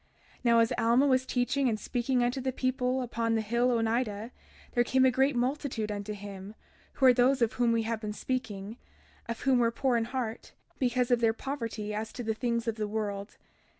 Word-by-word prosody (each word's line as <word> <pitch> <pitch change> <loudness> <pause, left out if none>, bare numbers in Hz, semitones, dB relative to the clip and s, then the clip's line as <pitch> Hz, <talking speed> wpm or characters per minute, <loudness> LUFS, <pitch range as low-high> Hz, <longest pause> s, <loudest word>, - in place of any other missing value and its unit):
32:4 - - -32
Now, 235 -1 +5
as 230 - +2
Alma 235 +4 +4
was 260 -2 +2
teaching 255 +2 +1
and 215 -2 -1
speaking 245 +1 0
unto 245 +2 0
the 260 +1 -1
people 255 0 0
upon 230 -1 -1
the 220 - +1
hill 235 +3 +1
Onidah, 225 -1 0 0.4
there 240 - +3
came 260 +2 +3
a 260 - +5
great 265 +2 +2
multitude 245 -3 -1
unto 205 +1 -4
him, 200 0 -9 0.4
who 265 - +1
were 255 - +8
those 255 +2 +3
of 225 - +1
whom 240 -2 +2
we 230 -1 +1
have 225 0 -3
been 210 -1 -3
speaking, 215 -3 -4 0.5
of 230 - -4
whom 265 -2 +3
were 235 -1 +3
poor 240 +1 +1
in 225 - 0
heart, 240 -2 -4 0.3
because 250 -1 +1
of 245 - +4
their 225 -1 +3
poverty 230 -5 -4
as 220 +1 -4
to 245 - -5
the 220 -1 0
things 235 0 -2
of 225 -1 -1
the 215 -1 -2
world. 205 -1 -4
235 Hz, 210 wpm, -29 LUFS, 220-255 Hz, 0.5 s, were